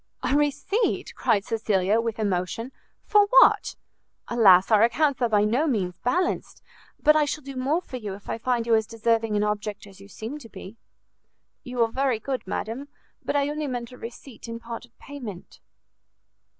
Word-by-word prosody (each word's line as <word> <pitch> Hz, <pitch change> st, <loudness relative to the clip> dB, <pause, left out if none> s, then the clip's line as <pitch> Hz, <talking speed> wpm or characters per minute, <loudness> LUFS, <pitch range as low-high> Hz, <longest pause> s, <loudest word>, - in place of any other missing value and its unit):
"A -, -, +1 dB
receipt?" 295 Hz, -, 0 dB
cried 200 Hz, -2 st, +1 dB
Cecilia, 215 Hz, -1 st, +1 dB
with 230 Hz, 0 st, -3 dB
emotion, 205 Hz, +4 st, -2 dB, 0.3 s
"for 415 Hz, -1 st, +4 dB
what? -, -, +5 dB, 0.5 s
Alas, 195 Hz, -5 st, +5 dB
our 215 Hz, -1 st, +6 dB
accounts 265 Hz, +4 st, +2 dB
are 240 Hz, -, +2 dB
by 210 Hz, -2 st, +3 dB
no 245 Hz, +9 st, +1 dB
means 195 Hz, -10 st, 0 dB
balanced! 355 Hz, +9 st, -1 dB, 0.4 s
but 305 Hz, -, +5 dB
I 305 Hz, -1 st, +4 dB
shall 300 Hz, +1 st, -4 dB
do 275 Hz, 0 st, -8 dB
more 285 Hz, +7 st, 0 dB
for 255 Hz, -, -7 dB
you 210 Hz, -5 st, -5 dB
if 200 Hz, -, -16 dB
I -, -, -3 dB
find 240 Hz, -1 st, 0 dB
you 230 Hz, -, +2 dB
as 220 Hz, -1 st, +3 dB
deserving 225 Hz, -1 st, 0 dB
an 205 Hz, -, +2 dB
object 210 Hz, 0 st, -3 dB
as 195 Hz, -1 st, -15 dB
you 200 Hz, -, -13 dB
seem 225 Hz, +8 st, -7 dB
to 230 Hz, -, -13 dB
be." 200 Hz, +1 st, -10 dB, 0.9 s
"You 250 Hz, -1 st, 0 dB
are 225 Hz, -, -1 dB
very 260 Hz, -3 st, 0 dB
good, 255 Hz, -2 st, -4 dB
madam; 230 Hz, +8 st, -4 dB, 0.4 s
but -, -, -2 dB
I 285 Hz, 0 st, +2 dB
only 300 Hz, 0 st, -3 dB
meant 245 Hz, -2 st, -4 dB
a 250 Hz, -, -12 dB
receipt 235 Hz, +1 st, -10 dB
in 230 Hz, 0 st, -6 dB
part 230 Hz, 0 st, -7 dB
of 240 Hz, -, -32 dB
payment." 240 Hz, -10 st, -9 dB
230 Hz, 185 wpm, -25 LUFS, 210-275 Hz, 0.9 s, our